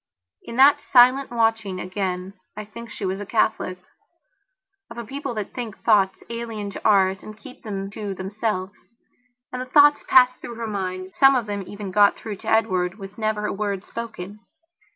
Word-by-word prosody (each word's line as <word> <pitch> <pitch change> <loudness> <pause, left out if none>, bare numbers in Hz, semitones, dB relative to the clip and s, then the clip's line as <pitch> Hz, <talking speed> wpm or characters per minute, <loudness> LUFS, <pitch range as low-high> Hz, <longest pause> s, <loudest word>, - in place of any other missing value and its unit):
In 230 - -9
that 275 +3 +6
silent 255 +2 +5
watching, 225 -5 0
again, 185 0 -3 0.2
I 215 - -5
think 235 +2 -10
she 205 - -6
was 190 +1 -2
a - - -4
Catholicof 185 - 0 1.1
a 235 0 -7
people 270 +1 -5
that 210 -2 -4
can - - -34
think 235 -5 -7
thoughts 200 -4 +3
alien 225 -3 -5
to - - -8
ours 190 -2 +3
and 215 0 -11
keep 255 +2 -13
them 195 -3 -5
to 205 -2 -5
themselves. 195 0 -4 0.6
And 250 - -3
the 255 - -6
thoughts 290 +2 +5
passed 255 -1 +5
through 235 - -7
her 230 0 -5
mind; 185 -3 -4
some 270 0 +6
of 245 -3 0
them 205 -1 -4
even 205 -2 -7
got 205 +1 +5
through 210 -3 -7
to - - -7
Edward 190 -4 +1
with 195 +1 -10
never 215 -1 -1
a - - -2
word 200 -2 -3
spoken. 215 -3 -7
210 Hz, 180 wpm, -23 LUFS, 195-235 Hz, 1.1 s, that